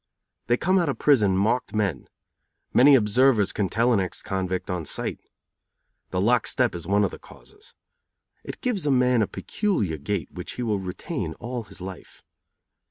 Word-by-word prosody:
They 120 - +3
come 185 +6 +2
out 170 -4 +1
of 140 - -2
prison 105 -10 +3
marked 110 +4 0
men. 95 -11 -1 0.7
Many 140 +3 +7
observers 115 -1 +3
can 100 -3 -1
tell 120 +2 +2
an 105 - +3
ex 90 -2 -4
convict 95 -1 -3
on 90 -2 -2
sight. - - -3 0.9
The 90 - -2
lock 115 +4 +2
step 125 -2 +1
is 85 -2 -7
one 100 +1 +3
of - - 0
the - - -9
causes. 420 0 -15 0.7
It - - -8
gives 215 - -1
a - - +3
man 125 -2 +3
a 105 - +1
peculiar 105 - -2
gait 90 +2 -3
which - - -7
he 125 - -4
will 105 -4 0
retain 90 - -5
all 120 -1 -5
his 95 - -11
life. 95 -1 -10
105 Hz, 175 wpm, -25 LUFS, 95-125 Hz, 0.9 s, Many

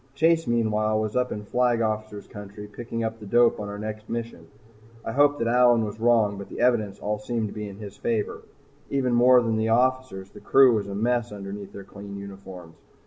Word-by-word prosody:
Chase, 165 +3 +2
meanwhile, 110 -2 +1
was 110 -1 -3
up 125 0 0
in 105 0 -5
Flag 125 +1 +1
Officer's 110 -2 -3
Country 105 0 -10
picking 115 +2 -6
up 110 0 -3
the 105 - -10
dope 120 +2 +3
on 105 -1 -5
our 100 - -6
next 110 0 -7
mission. 115 -8 -5 0.6
I - - -3
hoped 145 +1 +3
that 115 - -1
Allyn 120 -1 +4
was 105 +1 -7
wrong 110 -3 +2
but 100 - -8
the - - -8
evidence 110 -5 +1
all 105 0 -3
seemed 110 0 -2
to - - -9
be 105 -1 -6
in 100 - -11
his 105 -1 -9
favor. 110 -3 -2 0.5
Even 130 -3 0
more 125 +1 +6
than 115 -1 0
the 110 0 0
officers, 125 -5 0
the - - -12
crew 135 -2 +5
was 105 -3 -1
a 100 - -5
mess 120 +2 0
underneath 100 0 -7
their 100 - -9
clean 100 0 -10
uniforms. 95 -4 -10
110 Hz, 210 wpm, -25 LUFS, 105-120 Hz, 0.6 s, more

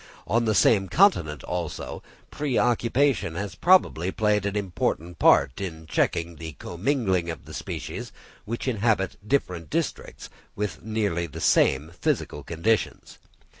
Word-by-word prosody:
On 115 +2 +1
the 110 -1 +1
same 95 0 +4
continent, 85 - +3
also, 90 -3 -4 0.3
pre 145 -5 -1
occupation 120 - +2
has 100 0 -4
probably 95 - +3
played 105 -1 +1
an 100 - -3
important 90 -3 -2
part 65 - +4
in 80 -4 -6
checking 85 +2 -1
the 80 -1 -7
commingling 95 - -1
of 80 - -6
the - - -11
species - - -6 0.3
which 115 +4 -5
inhabit 110 -5 +1
different 90 - -1
districts - - -3 0.3
with 95 -7 -3
nearly 105 -6 -1
the 70 - -9
same 70 +4 +3
physical 90 - -2
conditions. 95 +7 -1
95 Hz, 130 wpm, -25 LUFS, 85-115 Hz, 0.3 s, same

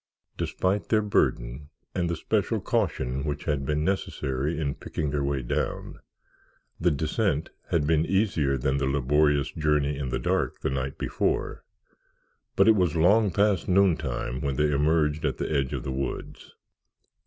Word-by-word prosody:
Despite 95 +2 -1
their 110 -1 +3
burden 70 -8 0 0.2
and 85 -2 -1
the 85 - -1
special - - 0
caution 65 +1 -1
which 75 -2 -3
had 70 -3 -1
been 75 0 0
necessary 75 -6 -1
in 70 -3 -1
picking 75 0 -4
their 70 -1 -1
way 70 -1 -1
down, - - -3 0.8
the 90 - +3
descent 80 +2 -1 0.2
had 80 -3 +1
been 80 +1 +2
easier 90 -9 +1
than 65 +1 0
the 70 -1 0
laborious 70 +2 +2
journey 75 -2 +1
in 65 -3 -3
the - - -1
dark - - -1
the - - -1
night 65 0 -3
before, - - -1 0.9
but - - +4
it 110 - +7
was 90 -6 +1
long 100 +6 +4
past 100 0 +1
noontime 90 -9 +1
when 70 -1 -1
they 75 +1 +2
emerged 75 +1 +2
at - - 0
the - - -3
edge 65 -2 0
of - - -3
the 65 - -3
woods. 65 0 -5
75 Hz, 160 wpm, -26 LUFS, 70-85 Hz, 0.9 s, it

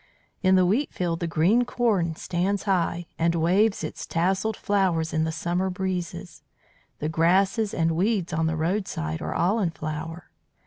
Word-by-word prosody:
"In 190 -1 +4
the 185 -1 +5
wheatfield 180 - 0
the 170 - -2
green 175 +10 +3
corn 215 -9 0
stands 185 +4 -1
high, 175 -3 0
and 170 +1 +2
waves 190 +6 +2
its - - -5
tasselled 190 +6 0
flowers 185 -6 0
in 160 0 +1
the 160 - -1
summer 175 +3 -1
breezes. 180 -2 -4 0.6
The 150 - -3
grasses 190 +7 +2
and 165 -1 +1
weeds 185 +1 0
on 160 0 +1
the 160 0 -1
roadside 160 - -2
are - - -3
all 190 +7 +2
in 190 -5 +1
flower. 160 +1 -6
175 Hz, 160 wpm, -25 LUFS, 165-195 Hz, 0.6 s, the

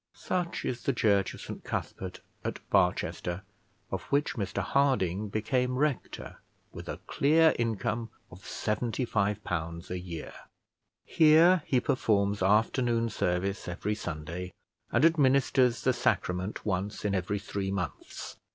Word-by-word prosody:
Such 180 -2 -2
is 120 -1 -2
the 135 - 0
church 100 -4 +2
of - - -11
St - - -7
Cuthbert 95 -1 -4 0.2
at - - -3
Barchester, 90 +2 +1 0.5
of - - -2
which 145 +1 +1
Mr 100 -6 -4
Harding 105 -8 +1
became 125 +4 0
rector, 145 -2 -2 0.3
with - - -9
a - - -3
clear 160 +3 +4
income 115 0 -1 0.2
of 90 +1 -13
seventy 115 +4 -2
five 105 -2 0
pounds 85 0 -4
a 90 - -2
year. 85 -3 -7 0.7
Here 165 +3 +6
he 130 - +3
performs 100 -5 +1
afternoon 115 +4 +2
service 95 +1 -1
every 90 +4 -2
Sunday, 85 -1 -5 0.4
and 120 +6 +4
administers 135 -5 +3
the - - +3
Sacrament 90 +3 -1
once 100 +1 -2
in 100 - +1
every 95 +2 0
three 100 -1 -3
months. 95 -1 -5
105 Hz, 135 wpm, -29 LUFS, 95-130 Hz, 0.7 s, Here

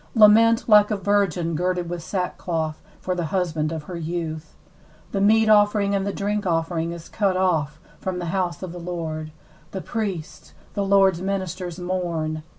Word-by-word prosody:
8Lament 225 +1 +6
like 210 -2 +6
a 210 - 0
virgin 195 -4 +1
girded 180 +1 -1
with 175 0 -4
sackcloth 165 -3 -3 0.2
for 185 - -2
the 175 -2 -2
husband 160 -2 -1
of 160 -2 -4
her 175 +3 -7
youth. 160 -2 -5 0.6
9The 195 - 0
meat 220 +2 +4
offering 205 -1 +4
and 195 0 0
the - - 0
drink 205 0 -2
offering 165 0 0
is 170 -1 -8
cut 195 -4 0
off 160 -6 0 0.2
from 185 -1 -3
the 175 - -4
house 180 -2 -1
of 185 - -5
the 175 - -8
Lord; 160 -3 -5 0.4
the 190 - -5
priests, 195 -9 -5 0.2
the 200 - -1
Lord'S 195 -3 +4
ministers, 185 -2 -3
mourn. 170 -4 -2
180 Hz, 165 wpm, -23 LUFS, 165-200 Hz, 0.6 s, 8Lament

